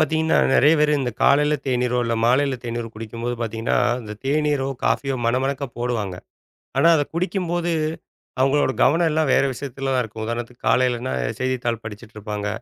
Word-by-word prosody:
பாத்தீங்கன்னா 160 +1 +2 0.2
நிறைய 150 +4 +6
பேரு 150 0 +3
இந்தக் 125 -4 -4
காலைல 150 +2 +4
தேனீர் 125 -1 0
இல்ல 115 0 0
மாலைல 130 +2 +2
தேநீர் 115 -1 -4
குடிக்கும்போது 115 +2 -5
பாத்தீங்கன்னா 115 0 -1 0.2
அந்தத் 105 -2 -9
தேனீரோ 145 -1 +1 0.2
காபியோ 135 -1 +1
மனமனக்க 135 +3 0
போடுவாங்க. 115 -6 -2 0.6
ஆனா 165 - +5
அதைக் 145 0 -2
குடிக்கும்போது 175 -1 -1 0.7
அவுங்களோட 135 0 +3
கவனம் 165 +5 +4
எல்லாம் 155 -2 +1
வேற - - +4
விஷியத்துலதான் 135 0 -2
இருக்கும். 110 -1 -7
உதாரணத்துக்கு 120 +1 -5
காலைலன்னா 125 0 +1 0.3
செய்தித்தாள் 125 -3 -1
படிச்சிட்டு 110 +1 -10
இருப்பாங்க. 105 -1 -4
130 Hz, 145 wpm, -22 LUFS, 115-145 Hz, 0.7 s, நிறைய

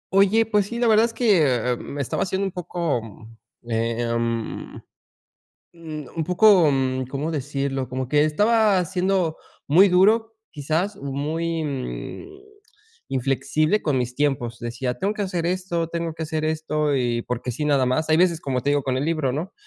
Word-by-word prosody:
Oye, 200 +3 +4
pues 210 -2 +1
sí, 235 - -5
la 240 - +1
verdad 220 +1 +5
es 230 - -10
que 140 - +2
me 145 - -7
estaba 140 - -2
haciendo 190 +1 -1
un 195 - -2
poco, 170 -7 -2 0.7
em, 115 0 -2 1.0
un 155 -1 -6
poco 180 -2 +5 0.4
cómo 150 +4 -3
decirlo 135 -2 -2
como 130 0 -4
que 145 +2 +3
estaba 205 +3 +3
siendo 185 -2 0 0.3
muy 180 +8 +6
duro, 220 +5 +3 0.2
quizás 160 +7 -1
muy 155 +4 -2
mm 255 - -6 0.6
inflexible 135 - 0
con 145 -5 +1
mis 125 0 -3
tiempos 125 -4 -1
decía 125 +2 -3
tengo 195 +8 -1
que 215 - -7
hacer 185 -4 -2
esto 175 -1 -1
tengo 170 -1 -3
que 160 - -6
hacer 155 0 -2
esto 155 -2 0
y 120 -2 0
porque 125 +1 -4
sí, 150 +5 -3
nada 140 -3 +3
más. 130 +6 0
Hay 155 - +4
veces, 170 -1 +3
como 130 -4 -2
te 140 - 0
digo, 145 0 +2
con 130 -1 -1
el 135 - -1
libro 155 -5 0
¿no?, 160 +8 -4
155 Hz, 160 wpm, -23 LUFS, 135-185 Hz, 1.0 s, muy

